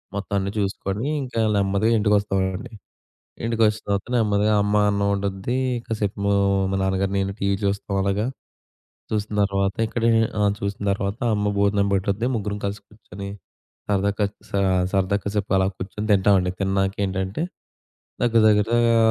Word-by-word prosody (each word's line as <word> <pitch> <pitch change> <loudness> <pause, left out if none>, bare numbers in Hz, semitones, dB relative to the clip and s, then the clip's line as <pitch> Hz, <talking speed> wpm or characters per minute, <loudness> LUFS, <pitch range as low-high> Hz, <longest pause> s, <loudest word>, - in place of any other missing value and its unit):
మొత్తం 100 0 -4
అన్నీ 100 +1 -2
చూసుకొని, 100 +2 -2 0.2
ఇంకా 125 -3 -2 0.2
నెమ్మదిగా 100 +3 +2
ఇంటికొస్తామండి. 100 0 0 0.7
ఇంటికొచ్చిన 110 -2 +1
తర్వాత 100 -1 0
నెమ్మదిగా 105 -2 +2
అమ్మ 105 +1 0 0.2
అన్నం 100 0 0
ఉండుద్ది 100 +5 -2 0.3
కాసేపు 105 -3 -2 0.5
మా - - +1
నాన్నగారు 95 0 0
నేను 100 0 -1
టీవీ 100 0 +1
చూస్తాం 100 0 -1
అలాగా. 100 +3 0 0.9
చూసిన 105 0 -2
తర్వాత 100 -1 0
ఇక్కడే 115 +1 +1 0.3
ఆ! - - +3 0.2
చూసిన 100 +1 -3
తర్వాత 100 +2 -3 0.2
అమ్మ 105 0 0
భోజనం 100 0 +2
పెట్టుద్ది 100 +4 0
ముగ్గురం 105 -1 -3
కలిసి 100 +1 -4
కూర్చొని 100 -2 -10 0.6
సరదా 100 0 +2
కా 105 - +3 0.3
సా 100 - 0 0.3
సరదా 95 0 +2
కాసేపలా 100 -2 +1
కూర్చొని 105 +3 -5
తింటామండి 95 -2 +3
తిన్నకేంటంటే 95 +2 -1 0.8
దగ్గర 115 -2 +4
దగ్గరగా 115 +3 +3
100 Hz, 130 wpm, -23 LUFS, 95-105 Hz, 0.9 s, దగ్గర